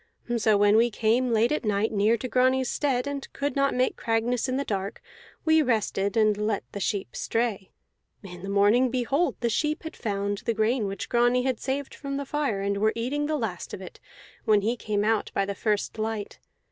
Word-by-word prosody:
So 215 Hz, -2 st, +3 dB
when 205 Hz, +1 st, +5 dB
we 235 Hz, +1 st, +4 dB
came 235 Hz, +3 st, +1 dB
late 230 Hz, +2 st, +3 dB
at 300 Hz, -, 0 dB
night 210 Hz, 0 st, +1 dB
near 215 Hz, +2 st, +3 dB
to 255 Hz, -, -4 dB
Grani's 255 Hz, 0 st, +2 dB
stead, 260 Hz, -4 st, 0 dB
and 285 Hz, -1 st, -5 dB
could 285 Hz, -1 st, -2 dB
not 275 Hz, 0 st, +2 dB
make 255 Hz, +1 st, +1 dB
Cragness 230 Hz, +2 st, 0 dB
in 255 Hz, -, 0 dB
the 280 Hz, -, 0 dB
dark, 195 Hz, -1 st, -3 dB, 0.5 s
we 315 Hz, 0 st, +5 dB
rested 220 Hz, -5 st, 0 dB
and 215 Hz, -1 st, +4 dB
let 210 Hz, 0 st, -1 dB
the 200 Hz, -, -5 dB
sheep 195 Hz, -, -2 dB
stray. 225 Hz, -5 st, -1 dB, 0.5 s
In 180 Hz, -2 st, -9 dB
the 195 Hz, -, -6 dB
morning, 205 Hz, +6 st, +4 dB
behold, 265 Hz, +7 st, 0 dB
the 240 Hz, -, +1 dB
sheep 300 Hz, +8 st, -1 dB
had 320 Hz, -, -7 dB
found 200 Hz, -2 st, -2 dB
the 230 Hz, -, -2 dB
grain 220 Hz, 0 st, +1 dB
which 195 Hz, -1 st, -5 dB
Grani 245 Hz, +1 st, +3 dB
had 260 Hz, -3 st, -1 dB
saved 275 Hz, +1 st, -3 dB
from 275 Hz, -1 st, -5 dB
the 280 Hz, -, -3 dB
fire, 275 Hz, -9 st, -1 dB
and 200 Hz, 0 st, -1 dB
were 215 Hz, +1 st, +2 dB
eating 275 Hz, +6 st, -1 dB
the 310 Hz, 0 st, 0 dB
last 215 Hz, -9 st, -4 dB
of -, -, -11 dB
it -, -, -11 dB, 0.4 s
when 215 Hz, -2 st, +4 dB
he 225 Hz, +4 st, 0 dB
came 210 Hz, -3 st, -1 dB
out 220 Hz, 0 st, +1 dB
by 195 Hz, -, +2 dB
the 200 Hz, -, -3 dB
first 210 Hz, +1 st, -1 dB
light. 215 Hz, -1 st, -3 dB
225 Hz, 210 wpm, -26 LUFS, 205-255 Hz, 0.5 s, when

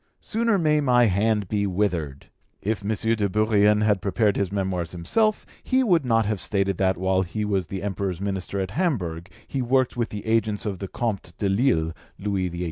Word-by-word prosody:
Sooner 225 Hz, -1 st, +1 dB
may 155 Hz, -3 st, +2 dB
my 125 Hz, -3 st, +4 dB
hand 105 Hz, 0 st, +1 dB
be 100 Hz, +1 st, 0 dB
withered.' 90 Hz, -8 st, -2 dB, 0.3 s
If 105 Hz, 0 st, -2 dB
M. -, -, -5 dB, 0.3 s
de 105 Hz, -3 st, 0 dB
Bourrienne 105 Hz, +1 st, +3 dB
had 105 Hz, -3 st, +2 dB
prepared 100 Hz, +1 st, +1 dB
his 100 Hz, -2 st, -1 dB
Memoirs 95 Hz, -4 st, -2 dB
himself, 210 Hz, -, +1 dB, 0.2 s
he 260 Hz, 0 st, +2 dB
would 175 Hz, -, +3 dB
not 115 Hz, -2 st, +3 dB
have 105 Hz, -2 st, -2 dB
stated 100 Hz, -2 st, -1 dB
that 95 Hz, -2 st, +2 dB
while 95 Hz, +1 st, +1 dB
he 95 Hz, +4 st, -3 dB
was 95 Hz, -4 st, 0 dB
the 95 Hz, 0 st, -5 dB
Emperor's 95 Hz, -3 st, -2 dB
minister 100 Hz, 0 st, -3 dB
at 95 Hz, -1 st, -2 dB
Hamburg 95 Hz, -, -2 dB, 0.2 s
he 135 Hz, -, -2 dB
worked 130 Hz, +1 st, +1 dB
with 120 Hz, -1 st, -1 dB
the 105 Hz, -1 st, -7 dB
agents 110 Hz, -2 st, 0 dB
of 100 Hz, -4 st, -3 dB
the 95 Hz, -, -4 dB
Comte 100 Hz, -6 st, -3 dB
de 100 Hz, -, 0 dB
Lille 95 Hz, -6 st, +2 dB, 0.2 s
(Louis 95 Hz, -2 st, -1 dB
XVIII.) 85 Hz, 0 st, -7 dB
100 Hz, 195 wpm, -24 LUFS, 95-115 Hz, 0.3 s, my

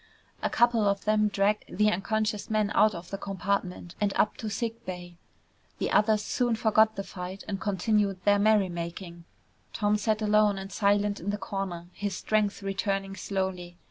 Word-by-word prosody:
A -, -, 0 dB
couple 235 Hz, -2 st, +3 dB
of 200 Hz, -1 st, -2 dB
them 215 Hz, 0 st, +3 dB
dragged 205 Hz, +1 st, 0 dB
the 210 Hz, 0 st, +4 dB
unconscious 215 Hz, +2 st, -1 dB
man 215 Hz, -2 st, +1 dB
out 215 Hz, -1 st, +4 dB
of 170 Hz, +1 st, -9 dB
the 195 Hz, -, -4 dB
compartment 190 Hz, -3 st, -3 dB
and 205 Hz, -1 st, +2 dB
up -, -, +2 dB
to 220 Hz, -, -4 dB
sick 230 Hz, +2 st, -3 dB
bay. 175 Hz, -3 st, -8 dB, 0.6 s
The -, -, -2 dB
others 210 Hz, 0 st, +3 dB
soon 240 Hz, 0 st, 0 dB
forgot 220 Hz, 0 st, +3 dB
the 195 Hz, -, -3 dB
fight 185 Hz, 0 st, -7 dB
and 195 Hz, -1 st, -4 dB
continued 205 Hz, -1 st, +1 dB
their 205 Hz, 0 st, +5 dB
merrymaking. 175 Hz, -4 st, 0 dB, 0.5 s
Tom 210 Hz, -1 st, +1 dB
sat 215 Hz, +1 st, 0 dB
alone 210 Hz, -1 st, +3 dB
and 195 Hz, 0 st, -7 dB
silent 205 Hz, 0 st, +1 dB
in 190 Hz, -, -4 dB
the 205 Hz, -, -1 dB
corner, 190 Hz, -3 st, -5 dB
his 205 Hz, -1 st, -3 dB
strength 210 Hz, -2 st, 0 dB
returning 195 Hz, 0 st, -2 dB
slowly. 185 Hz, -3 st, -3 dB
200 Hz, 170 wpm, -28 LUFS, 190-215 Hz, 0.6 s, their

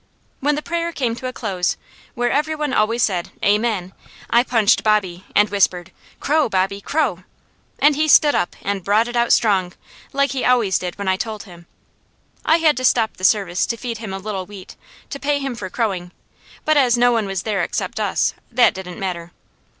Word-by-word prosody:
When 290 Hz, +2 st, +1 dB
the 300 Hz, -, -4 dB
prayer 340 Hz, 0 st, -2 dB
came 250 Hz, -8 st, -1 dB
to 255 Hz, -, -5 dB
a -, -, -3 dB
close, 190 Hz, -8 st, -2 dB, 0.4 s
where 240 Hz, 0 st, 0 dB
every 305 Hz, +2 st, 0 dB
one 300 Hz, -3 st, -2 dB
always 225 Hz, +2 st, +2 dB
said 180 Hz, -4 st, -1 dB, 0.2 s
"Amen," 205 Hz, -3 st, +1 dB, 0.4 s
I 235 Hz, -, +6 dB
punched 230 Hz, -3 st, +3 dB
Bobby 190 Hz, -4 st, 0 dB
and 210 Hz, +1 st, +5 dB
whispered, 185 Hz, -3 st, +1 dB, 0.3 s
"Crow, 300 Hz, -2 st, +1 dB
Bobby, 195 Hz, 0 st, 0 dB
crow!" 250 Hz, -, -1 dB, 0.5 s
and 295 Hz, 0 st, +4 dB
he 310 Hz, +2 st, +1 dB
stood 295 Hz, -1 st, +6 dB
up -, -, -1 dB
and 200 Hz, -1 st, -2 dB
brought 210 Hz, +5 st, +2 dB
it 240 Hz, -, -6 dB
out 235 Hz, 0 st, +2 dB
strong, 190 Hz, -5 st, +2 dB, 0.4 s
like 280 Hz, 0 st, +1 dB
he 270 Hz, -2 st, -2 dB
always 235 Hz, -6 st, +3 dB
did 180 Hz, -1 st, -5 dB
when 200 Hz, -1 st, -5 dB
I 190 Hz, 0 st, +2 dB
told 215 Hz, 0 st, -5 dB
him. 175 Hz, -3 st, -15 dB, 0.8 s
I 320 Hz, -, +4 dB
had 315 Hz, -5 st, +3 dB
to 255 Hz, -, -3 dB
stop 230 Hz, -3 st, +2 dB
the 185 Hz, -, -13 dB
service 190 Hz, -2 st, +2 dB
to 230 Hz, -, -2 dB
feed 230 Hz, -2 st, -5 dB
him 220 Hz, -4 st, -6 dB
a 190 Hz, -, -4 dB
little 195 Hz, -2 st, -5 dB
wheat, 200 Hz, -2 st, -11 dB, 0.4 s
to 280 Hz, -, -5 dB
pay 290 Hz, +1 st, 0 dB
him 275 Hz, -2 st, -3 dB
for 205 Hz, -5 st, -6 dB
crowing; 185 Hz, -5 st, -3 dB, 0.5 s
but 310 Hz, 0 st, +3 dB
as 250 Hz, -4 st, +4 dB
no 245 Hz, 0 st, +4 dB
one 225 Hz, -4 st, 0 dB
was 195 Hz, -1 st, -3 dB
there 210 Hz, -3 st, -1 dB
except -, -, -3 dB
us, -, -, 0 dB, 0.2 s
that 240 Hz, +1 st, +4 dB
didn't 185 Hz, -2 st, -8 dB
matter. 175 Hz, -3 st, -5 dB
220 Hz, 200 wpm, -20 LUFS, 190-255 Hz, 0.8 s, I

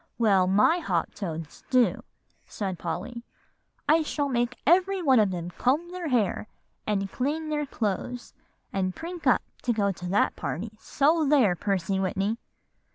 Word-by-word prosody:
"Well, 195 Hz, -5 st, +4 dB
my 210 Hz, -, +4 dB
hop 180 Hz, -, -1 dB
toads 165 Hz, -6 st, -6 dB
do," 245 Hz, -8 st, +3 dB, 0.5 s
said 190 Hz, -5 st, -4 dB
Polly. 195 Hz, +8 st, -4 dB, 0.7 s
"I 315 Hz, +2 st, +5 dB
shall 290 Hz, -2 st, -1 dB
make 240 Hz, -1 st, 0 dB
every 375 Hz, +4 st, +4 dB
one 270 Hz, -8 st, +4 dB
of 210 Hz, -2 st, +4 dB
them 175 Hz, -1 st, -4 dB
comb 295 Hz, -, 0 dB
their 360 Hz, -2 st, -4 dB
hair, 225 Hz, -5 st, 0 dB, 0.4 s
and 195 Hz, -2 st, -1 dB
clean 310 Hz, +5 st, -2 dB
their 295 Hz, -1 st, -1 dB
clothes, 235 Hz, +2 st, -3 dB, 0.4 s
and 185 Hz, -1 st, -1 dB
prink 335 Hz, -2 st, -6 dB
up 250 Hz, -, +4 dB, 0.2 s
to 245 Hz, -, 0 dB
go 205 Hz, -3 st, +1 dB
to 180 Hz, -1 st, -7 dB
that 200 Hz, +3 st, +2 dB
party, 205 Hz, +7 st, -4 dB
so 310 Hz, +7 st, +2 dB
there, 250 Hz, -11 st, +4 dB
Percy 195 Hz, 0 st, -1 dB
Whitney!" 195 Hz, +4 st, -1 dB
225 Hz, 155 wpm, -27 LUFS, 190-295 Hz, 0.7 s, I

